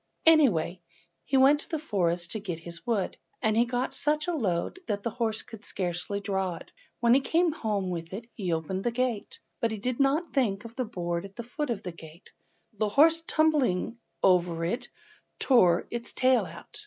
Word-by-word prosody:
Away 200 - +4 0.4
he 270 - +2
went 275 +3 +6
to - - -11
the 320 - -1
forest 175 - -1
to 220 - -3
get 185 -5 -4
his 170 +3 -8
wood, 215 -6 0 0.2
and 220 -3 +1
he 235 +2 +4
got 250 +2 -2
such 300 +2 0
a 350 - 0
load 205 - -1
that 205 -2 -2
the 230 - -1
horse 225 -1 -2
could 225 -3 -12
scarcely 180 +1 -3
draw 190 -3 -1
it. - - -12 0.3
When 235 0 +5
he 265 - +6
came 330 +5 +2
home 210 - -2
with 165 -1 -5
it 220 +5 -6
he 185 -5 -3
opened 165 +4 -2
the - - +2
gate, 240 -3 -2 0.2
but 230 - +1
he 220 - -3
did 245 +5 -2
not 285 +5 +2
think 220 -7 +1
of 230 0 -10
the 255 - -1
board 175 -5 -3
at 195 0 -11
the 235 - -5
foot 285 +5 -4
of 230 -4 -2
the 180 - -4
gate, 165 +1 -14 0.4
and 210 - -31
the 215 - +3
horse 320 +8 +5
tumbling 260 -9 +2 0.2
over 175 -3 +3
it 235 +9 -2 0.5
tore 185 -10 +4
its 235 0 -4
tail 255 -1 +3
out! 430 - -11
220 Hz, 205 wpm, -28 LUFS, 180-260 Hz, 0.5 s, went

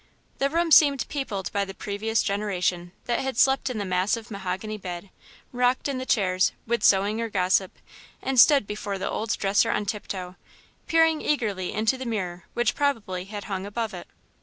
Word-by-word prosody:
The 275 - +2
room 335 +2 0
seemed 285 -3 +6
peopled 210 -10 -3
by 200 - 0
the 195 -1 -7
previous 215 +3 -1
generation, 185 -4 -1
that 240 - 0
had 265 -3 -3
slept 265 +1 +3
in 250 - -4
the 205 - -2
massive 195 +5 -1
mahogany 200 +2 -4
bed, 180 0 -7 0.4
rocked 250 +1 +1
in 275 -2 -2
the 260 - -6
chairs, 185 -3 +2
with 235 +1 -1
sewing 205 +3 +3
or 230 - -2
gossip, 185 -1 +1 0.5
and 265 -1 0
stood 280 -3 +7
before 205 -1 -4
the 190 - -3
old 220 0 -2
dresser 200 +3 +2
on 210 - 0
tiptoe, 190 -3 -5 0.5
peering 325 -1 +3
eagerly 210 -10 -1
into 220 +5 0
the 260 - -5
mirror 180 -6 -3
which 240 0 +2
probably 220 -11 -1
had 205 0 -7
hung 190 -2 -4
above 215 +2 -3
it. 175 - -8
210 Hz, 180 wpm, -25 LUFS, 190-245 Hz, 0.5 s, stood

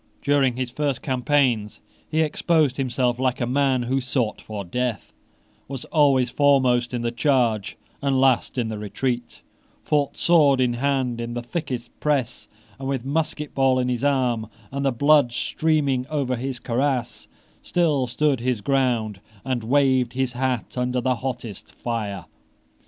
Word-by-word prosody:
During 140 -3 +2
his 125 -1 -3
first 140 -1 -2
campaigns 125 -5 +1 0.3
he 160 0 +1
exposed 155 -3 +1
himself 125 -2 0
like 130 0 0
a 120 - 0
man 130 0 +1
who 130 +3 0
sought 125 -3 -1
for 105 -2 -6
death, 120 +1 -3 0.5
was 135 -2 -6
always 135 -5 +3
foremost 130 -4 +3
in 120 -2 -3
the 120 - 0
charge 120 -5 +1 0.2
and 135 -2 +1
last 130 -1 +2
in 120 -3 0
the 110 -1 -5
retreat, 120 +3 -3 0.4
fought, 145 -2 0
sword 150 -6 +4
in 125 -2 +2
hand, 130 -2 -1
in 120 0 -5
the 120 - -3
thickest 125 -3 -4
press, 135 -5 -1 0.3
and, 135 - -5
with 135 -3 -2
a - - -8
musket 150 0 -2
ball 135 -1 +3
in 125 0 0
his 125 0 -2
arm 125 -6 +1 0.2
and 140 +1 -3
the 135 - +2
blood 140 0 +4
streaming 140 -3 0
over 140 -4 -1
his 130 +1 -4
cuirass, 125 +1 -1 0.3
still 150 -7 +1
stood 140 +2 +1
his 120 -2 -1
ground 115 -5 0 0.2
and 130 -3 -1
waved 130 -1 +2
his 130 -1 -1
hat 125 -1 -2
under 125 0 0
the 130 0 0
hottest 120 -4 -6
fire. 110 -5 -4
130 Hz, 155 wpm, -23 LUFS, 120-140 Hz, 0.5 s, sword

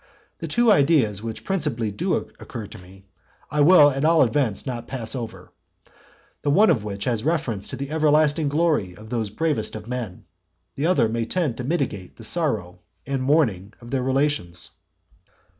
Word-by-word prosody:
The - - -5
two 240 -2 +3
ideas 140 - +3
which 115 0 -6
principally 120 - -1
do 100 - -1
occur 110 - -6
to - - -11
me, 95 +2 -16 0.5
I 150 - +1
will 145 -2 +7
at 135 +1 -3
all 160 0 +5
events 120 -4 0
not 120 -3 -5
pass 115 -4 -2
over; 115 -3 -7 0.9
the 145 - -1
one 205 +9 +5
of 110 - 0
which 100 -1 -5
has 115 -3 -1
reference 130 - -1
to - - -6
the 140 +2 -6
everlasting 155 -1 +3
glory 150 - +1
of 110 +1 -13
those 115 -4 -1
bravest 115 0 -2
of 110 0 -8
men; 120 -7 -5 0.5
the 145 +4 -1
other 175 -10 +3
may 115 +1 -2
tend 160 -7 -1
to 125 - -4
mitigate 125 - -2
the 115 - -13
sorrow 110 - -1 0.3
and 135 -1 -2
mourning 120 - +1
of 120 0 -12
their 135 -2 0
relations. 130 - 0
125 Hz, 175 wpm, -23 LUFS, 110-150 Hz, 0.9 s, will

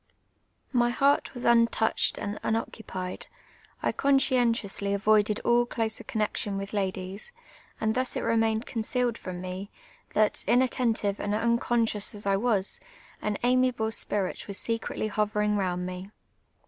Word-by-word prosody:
My 240 -1 +3
heart 275 +4 +2
was 245 - -5
untt)uched 230 -1 +3
and 205 +1 -4
unoccupied; 200 -4 -4 0.6
I - - +2
conscientiously 235 -7 +2
avoided 210 +1 +3
all 240 0 +3
closer 225 -2 -1
connexion 210 -2 -2
with 195 +1 -5
ladies, 190 - -3 0.5
and 220 0 +1
thus 255 +1 0
it - - -1
re 230 - +1
mained 225 +1 +1
concealed 240 0 -1
from 180 -5 -7
me, 185 +2 -6 0.5
that, 215 -1 +2
inattentive 235 -4 +2
and 205 0 -1
unconscious 230 -2 +1
as 205 - -4
I 195 0 +3
was, 205 -3 +1 0.4
an 210 -1 -1
amiable 250 -2 +2
sj)irit 205 -3 0
was 200 -1 -3
secretly 225 -1 -2
hoverin<j 210 0 0
round 180 -2 -1
me. 185 +1 -6
220 Hz, 135 wpm, -28 LUFS, 200-235 Hz, 0.6 s, My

